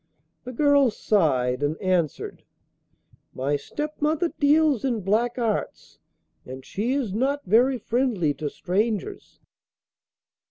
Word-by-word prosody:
The 250 Hz, -, -6 dB
girl 285 Hz, 0 st, +4 dB
sighed 140 Hz, -, +1 dB
and 145 Hz, +2 st, -1 dB
answered, 180 Hz, -6 st, -1 dB, 0.9 s
'My 135 Hz, +3 st, 0 dB
stepmother 300 Hz, -, -2 dB
deals 295 Hz, -4 st, +3 dB
in 240 Hz, -5 st, -1 dB
black 225 Hz, +6 st, 0 dB
arts, 230 Hz, -4 st, -3 dB, 0.4 s
and 130 Hz, +1 st, -10 dB
she 230 Hz, +6 st, -2 dB
is 260 Hz, -9 st, -2 dB
not 275 Hz, +6 st, -1 dB
very 245 Hz, +7 st, +3 dB
friendly 225 Hz, -, 0 dB
to 150 Hz, 0 st, -4 dB
strangers. 215 Hz, -, -3 dB
225 Hz, 110 wpm, -24 LUFS, 175-275 Hz, 0.9 s, girl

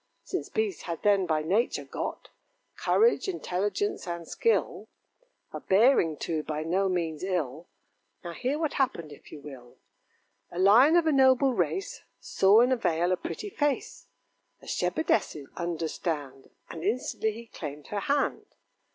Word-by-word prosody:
Since -, -, -4 dB
beasts 435 Hz, -4 st, -2 dB
had 165 Hz, -, -4 dB
then 200 Hz, -3 st, +3 dB
by 155 Hz, -1 st, 0 dB
nature 205 Hz, +10 st, 0 dB
got -, -, -5 dB, 0.5 s
Courage, 465 Hz, -1 st, +2 dB
intelligence, 275 Hz, -, -2 dB
and 170 Hz, -1 st, -5 dB
skill; 460 Hz, -, 0 dB, 0.7 s
A -, -, -4 dB
bearing, 190 Hz, -, +3 dB
too, 160 Hz, -2 st, -2 dB
by 155 Hz, 0 st, -4 dB
no 190 Hz, +4 st, +1 dB
means 165 Hz, -4 st, -2 dB
ill. 170 Hz, -4 st, -2 dB, 0.6 s
Now 170 Hz, -1 st, -6 dB
hear 260 Hz, -, -2 dB
what 315 Hz, -2 st, -1 dB
happened, 210 Hz, -, -1 dB
if 145 Hz, -, -14 dB
you 150 Hz, -, -9 dB
will: 130 Hz, -4 st, -12 dB, 0.7 s
A -, -, -10 dB
Lion 225 Hz, -, +6 dB
of 345 Hz, -1 st, +4 dB
a 315 Hz, -, +3 dB
noble 265 Hz, -1 st, +4 dB
race 390 Hz, +10 st, -2 dB, 0.2 s
Saw 200 Hz, +4 st, +4 dB
in 250 Hz, +2 st, +3 dB
a 260 Hz, -, +3 dB
vale 175 Hz, -5 st, +1 dB
a -, -, +3 dB
pretty 410 Hz, -, -6 dB
face, 290 Hz, -5 st, -2 dB, 0.5 s
A -, -, -17 dB
shepherdess's, 195 Hz, -, -1 dB
understand, 160 Hz, -5 st, -4 dB, 0.2 s
And 165 Hz, -, -8 dB
instantly 220 Hz, +1 st, -1 dB
he 230 Hz, +2 st, -10 dB
claimed 150 Hz, -8 st, -8 dB
her 205 Hz, -, -2 dB
hand. 280 Hz, +7 st, -1 dB
190 Hz, 150 wpm, -28 LUFS, 160-260 Hz, 0.7 s, Lion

